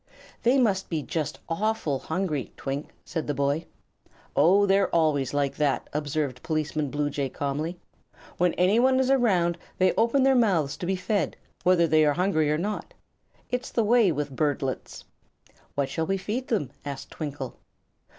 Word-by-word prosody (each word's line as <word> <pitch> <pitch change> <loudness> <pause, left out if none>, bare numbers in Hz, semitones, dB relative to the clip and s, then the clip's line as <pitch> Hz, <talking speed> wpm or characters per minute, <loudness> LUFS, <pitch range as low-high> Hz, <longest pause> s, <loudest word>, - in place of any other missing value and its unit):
"They 245 +4 +4
must 200 -7 +1
be 160 -4 -2
just 155 +4 -3
awful 165 -5 -1
hungry, 160 -4 -2
Twink," 140 +2 -4 0.2
said 160 -2 -4
the 145 - -1
boy. 140 +4 0 0.7
"Oh, 195 +5 +5
they're 195 0 +3
always 155 -5 +2
like 145 -1 0
that," 145 -3 0
observed 145 -3 -2
Policeman 155 -2 -1
Bluejay, 145 -1 -1
calmly. 145 +6 -3 0.6
"When 180 -1 +2
anyone 235 +9 +4
is 265 0 +2
around 180 -10 +2 0.2
they 185 0 +3
open 235 +5 +3
their 270 0 +5
mouths 190 - +2
to 175 - -4
be 190 - +1
fed, 185 -1 -1 0.2
whether 175 -1 +4
they 155 -1 +4
are 150 -1 +4
hungry 175 -5 +2
or 150 - +2
not. 205 +6 -4 0.6
It's 250 0 -2
the 230 - +1
way 220 -3 +4
with 145 -3 -3
birdlets." 140 -3 -2 0.7
"What 140 -1 +1
shall 160 +2 -2
we 195 - +1
feed 215 +7 -3
them?" 195 - -1
asked 140 -1 -6
Twinkle. 145 -5 -6
165 Hz, 160 wpm, -26 LUFS, 145-200 Hz, 0.7 s, Oh